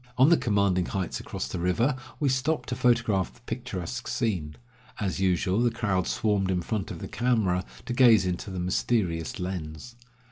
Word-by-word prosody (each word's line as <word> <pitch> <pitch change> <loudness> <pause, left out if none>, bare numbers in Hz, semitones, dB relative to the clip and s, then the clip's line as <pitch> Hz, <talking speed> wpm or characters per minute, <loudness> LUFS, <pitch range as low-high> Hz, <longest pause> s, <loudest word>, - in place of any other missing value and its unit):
On 130 +4 +6
the 170 - +7
commanding 100 - +1
heights 95 -3 -2
across - - -5
the 90 - -4
river, 115 +11 +1 0.2
we 145 - +1
stopped 135 +4 0
to 125 - -1
photograph 115 -7 +2
the - - -22
picturesque 120 -2 -5
scene. 90 - -1 0.4
As 95 -2 -2
usual, 95 +2 +2
the 120 - +4
crowd 105 -6 -1
swarmed 100 -3 +1
in 90 -2 0
front 105 +1 -2
of - - -6
the - - -6
camera 110 -7 +1 0.2
to 125 - -3
gaze 120 -6 +6
into 90 +3 -3
the 95 - -5
mysterious 90 -2 0
lens. 90 +4 -5
100 Hz, 175 wpm, -27 LUFS, 90-120 Hz, 0.4 s, the